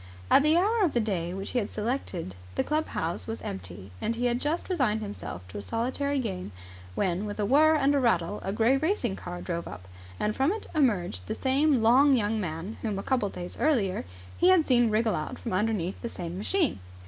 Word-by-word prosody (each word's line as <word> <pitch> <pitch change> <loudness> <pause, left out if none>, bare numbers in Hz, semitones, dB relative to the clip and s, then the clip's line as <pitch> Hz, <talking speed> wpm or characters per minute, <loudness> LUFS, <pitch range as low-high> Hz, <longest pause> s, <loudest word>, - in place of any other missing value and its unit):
At - - +8
the 305 +3 +4
hour 425 +4 +3
of 335 - +2
the 240 - +2
day 185 -6 -1
which 195 +2 -5
he 250 - +1
had 205 - -3
selected 210 - -3 0.2
the - - +1
club 310 +1 0
house 165 +2 -3
was 225 0 -4
empty, 95 +1 -7
and 230 - -1
he 245 +1 -1
had 245 +1 +1
just 310 +4 -1
resigned 250 - +1
himself 90 - -7
to 95 - -6
a - - -5
solitary 260 - -1
game, 190 - -3 0.4
when, 190 +2 0
with 205 +1 -6
a 205 - +1
whirr 310 +7 +5
and 285 -1 +3
a 285 - +3
rattle, 205 -6 +1
a 195 - -2
grey 225 +6 +3
racing 295 - 0
car 175 -1 -7
drove 170 -1 -3
up, 90 +1 -9 0.3
and 210 - 0
from 270 +5 +2
it 440 - -6
emerged 180 - +1
the - - -2
same 270 -1 +2
long 265 +5 +6
young 220 -1 0
man 170 +4 -5
whom, 215 -4 -2
a 195 - -4
couple 255 -6 +1
of - - -9
days 175 0 -7
earlier, 230 - +1 0.4
he 355 - +5
had 365 -4 +5
seen 240 -3 +4
wriggle 220 0 +2
out 155 -3 -3
from - - -5
underneath 195 -2 -1
the 235 - -4
same 175 -4 -6
machine. 285 - 0
225 Hz, 220 wpm, -28 LUFS, 185-275 Hz, 0.4 s, At